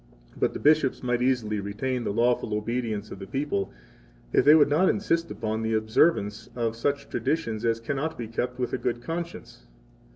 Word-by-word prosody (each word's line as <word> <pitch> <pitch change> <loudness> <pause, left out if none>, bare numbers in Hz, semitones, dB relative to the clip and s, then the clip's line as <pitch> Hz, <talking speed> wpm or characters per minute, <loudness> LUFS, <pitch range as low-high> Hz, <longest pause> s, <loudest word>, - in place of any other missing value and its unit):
69 - - -17
But - - +1
the - - -5
bishops 150 -4 +3
might 125 -1 0
easily 120 -5 +1
retain 120 +6 -2
the - - 0
lawful 115 -1 +1
obedience 110 -1 -2
of - - -8
the 95 - -8
people 135 -7 -2 0.6
if - - +5
they 150 +2 +8
would 150 -2 +6
not 160 +6 +3
insist 170 -5 0
upon 110 +1 -3
the 110 0 0
observance 110 0 +2
of 115 -2 -1
such 140 +4 -1
traditions 115 -9 -2
as 115 -1 +1
cannot 140 +6 -3
be 115 - -5
kept 125 +2 -3
with 125 -1 -2
a - - 0
good 120 0 -2
conscience. 165 - -6
120 Hz, 190 wpm, -26 LUFS, 110-145 Hz, 0.6 s, they